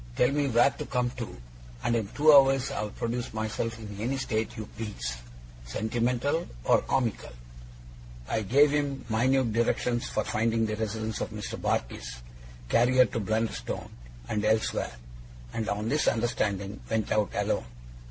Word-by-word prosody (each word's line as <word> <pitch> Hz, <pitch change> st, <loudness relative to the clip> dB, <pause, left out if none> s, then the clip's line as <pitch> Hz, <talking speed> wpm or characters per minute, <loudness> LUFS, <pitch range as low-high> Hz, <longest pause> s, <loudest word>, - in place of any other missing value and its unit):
Tell 125 Hz, -, +3 dB
me 145 Hz, 0 st, +1 dB
where 120 Hz, +2 st, +5 dB
to -, -, -6 dB
come 125 Hz, -1 st, 0 dB
to; 120 Hz, -, -7 dB, 0.5 s
and 120 Hz, -, +2 dB
in 110 Hz, -3 st, 0 dB
two 150 Hz, +8 st, +5 dB
hours 135 Hz, -1 st, +6 dB
I'll 105 Hz, 0 st, -2 dB
produce 115 Hz, +2 st, -3 dB
myself 110 Hz, +1 st, -2 dB
in 105 Hz, -2 st, -8 dB
any 125 Hz, +5 st, -1 dB
state 110 Hz, -4 st, -2 dB
you 110 Hz, -, -4 dB
please, 60 Hz, -, -4 dB, 0.5 s
sentimental 120 Hz, -, 0 dB, 0.2 s
or -, -, +4 dB
comical.' 120 Hz, -, -1 dB, 0.9 s
I 110 Hz, -, 0 dB
gave 140 Hz, +8 st, +5 dB
him 145 Hz, -2 st, -1 dB
minute 120 Hz, +1 st, +2 dB
directions 120 Hz, +1 st, +1 dB
for 110 Hz, -, 0 dB
finding 115 Hz, +1 st, +1 dB
the 110 Hz, -1 st, -2 dB
residence 110 Hz, 0 st, -3 dB
of -, -, -2 dB
Mr. 105 Hz, -1 st, -6 dB
Barkis, -, -, -2 dB, 0.5 s
carrier 125 Hz, -, +5 dB
to 115 Hz, -, -3 dB
Blunderstone 110 Hz, -, -2 dB, 0.4 s
and 105 Hz, +7 st, -1 dB
elsewhere; 110 Hz, -, +1 dB, 0.6 s
and, 110 Hz, -, -2 dB
on 105 Hz, +1 st, -1 dB
this 150 Hz, +5 st, +1 dB
understanding, 110 Hz, -4 st, 0 dB
went 110 Hz, -2 st, 0 dB
out 105 Hz, -2 st, +2 dB
alone. -, -, 0 dB
115 Hz, 150 wpm, -28 LUFS, 110-125 Hz, 0.9 s, hours